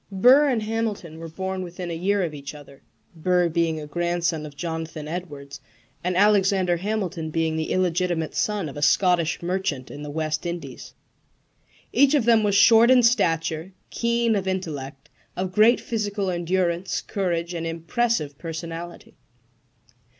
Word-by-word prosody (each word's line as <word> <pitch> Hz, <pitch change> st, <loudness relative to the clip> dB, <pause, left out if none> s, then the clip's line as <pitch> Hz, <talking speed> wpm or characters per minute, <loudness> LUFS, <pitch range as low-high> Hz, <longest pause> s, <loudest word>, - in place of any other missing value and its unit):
Burr 255 Hz, +9 st, +6 dB
and 235 Hz, -5 st, 0 dB
Hamilton 215 Hz, -7 st, -3 dB
were 165 Hz, -, -7 dB
born 190 Hz, +3 st, -4 dB
within 175 Hz, 0 st, -6 dB
a -, -, -3 dB
year 195 Hz, +4 st, +1 dB
of 165 Hz, -3 st, -3 dB
each 140 Hz, 0 st, -8 dB
other 140 Hz, -2 st, -14 dB, 0.3 s
Burr 180 Hz, +1 st, +2 dB
being 165 Hz, -1 st, 0 dB
a 150 Hz, -, -7 dB
grandson 170 Hz, 0 st, -1 dB
of 145 Hz, -, -13 dB
Jonathan 160 Hz, -2 st, -5 dB
Edwards, 145 Hz, -5 st, -7 dB, 0.4 s
and 180 Hz, 0 st, -1 dB
Alexander 195 Hz, -3 st, +3 dB
Hamilton 185 Hz, -4 st, -3 dB
being 160 Hz, 0 st, -1 dB
the 160 Hz, 0 st, -2 dB
illegitimate 175 Hz, -3 st, 0 dB
son 210 Hz, -5 st, -1 dB
of 140 Hz, -, -8 dB
a 145 Hz, -, -6 dB
Scottish 175 Hz, 0 st, +2 dB
merchant 170 Hz, -7 st, -2 dB
in 145 Hz, -, -8 dB
the 150 Hz, -, -6 dB
West 155 Hz, +2 st, -2 dB
Indies. 165 Hz, -7 st, -7 dB, 1.0 s
Each 280 Hz, +4 st, +5 dB
of 270 Hz, -6 st, +2 dB
them 230 Hz, -2 st, +5 dB
was 205 Hz, -2 st, +1 dB
short 225 Hz, +3 st, +7 dB
in 255 Hz, -1 st, +6 dB
stature, 165 Hz, -6 st, +1 dB, 0.2 s
keen 235 Hz, -1 st, +1 dB
of 195 Hz, -2 st, -2 dB
intellect, 150 Hz, -7 st, -4 dB, 0.3 s
of 185 Hz, 0 st, -2 dB
great 220 Hz, +4 st, +5 dB
physical 205 Hz, -4 st, -2 dB
endurance, 175 Hz, +1 st, -1 dB
courage, 175 Hz, -4 st, -2 dB
and 165 Hz, -1 st, -3 dB
impressive 165 Hz, -, -1 dB
personality. 165 Hz, +1 st, -7 dB
175 Hz, 150 wpm, -24 LUFS, 160-200 Hz, 1.0 s, short